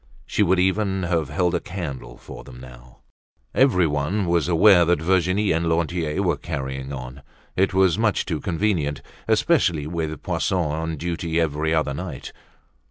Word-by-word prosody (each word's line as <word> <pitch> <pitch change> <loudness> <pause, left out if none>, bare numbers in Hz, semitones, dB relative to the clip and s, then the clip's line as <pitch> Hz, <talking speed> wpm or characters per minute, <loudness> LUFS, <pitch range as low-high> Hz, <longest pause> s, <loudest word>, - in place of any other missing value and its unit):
She - - -1
would 95 -2 +3
even 95 +1 +1
have 85 -4 -1
held 90 +4 0
a 85 - +1
candle 70 -11 -7
for - - -11
them 60 - -12
now. 60 -1 -14 0.5
Everyone 90 - +2
was 85 -2 +1
aware 90 +1 +6
that 85 -1 +2
Virginie 95 +4 +1
and 80 +1 0
Lantier 85 +1 -1
were 85 -6 +1
carrying 65 -3 -5
on. 65 0 -7 0.3
It 95 0 +1
was 95 0 +3
much 110 -2 +1
too 80 -4 -3
convenient, 80 -6 -1 0.2
especially 110 - +2
with 80 -2 -4
Poisson 95 - -1
on 80 -1 -2
duty 85 +1 -2
every 80 -1 0
other 75 -3 0
night. 80 -3 -7
85 Hz, 155 wpm, -23 LUFS, 75-95 Hz, 0.5 s, aware